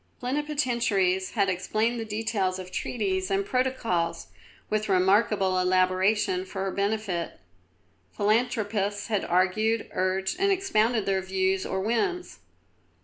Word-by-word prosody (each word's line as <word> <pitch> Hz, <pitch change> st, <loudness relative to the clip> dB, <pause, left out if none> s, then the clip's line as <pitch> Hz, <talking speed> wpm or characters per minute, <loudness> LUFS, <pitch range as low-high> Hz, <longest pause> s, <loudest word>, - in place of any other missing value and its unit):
Plenipotentiaries 240 Hz, -9 st, 0 dB
had 200 Hz, -4 st, +2 dB
explained 215 Hz, +6 st, 0 dB
the 225 Hz, -, -4 dB
details 210 Hz, -3 st, -1 dB
of 185 Hz, -1 st, -8 dB
treaties 190 Hz, -5 st, -2 dB
and 195 Hz, 0 st, 0 dB
protocols, 250 Hz, -9 st, -1 dB, 0.4 s
with 215 Hz, 0 st, -1 dB
remarkable 190 Hz, 0 st, +3 dB
elaboration, 185 Hz, +1 st, +2 dB
for 190 Hz, +1 st, -5 dB
her 195 Hz, -, -2 dB
benefit. 200 Hz, -4 st, -2 dB, 0.7 s
Philanthropists 210 Hz, -1 st, 0 dB
had 210 Hz, -3 st, 0 dB
argued, 210 Hz, +6 st, +1 dB
urged, 190 Hz, +1 st, -1 dB
and 395 Hz, +1 st, +3 dB
expounded 240 Hz, -, +1 dB
their 195 Hz, -1 st, +1 dB
views 190 Hz, 0 st, 0 dB
or 190 Hz, -, -2 dB
whims. 355 Hz, -, -1 dB
200 Hz, 115 wpm, -27 LUFS, 190-225 Hz, 0.7 s, remarkable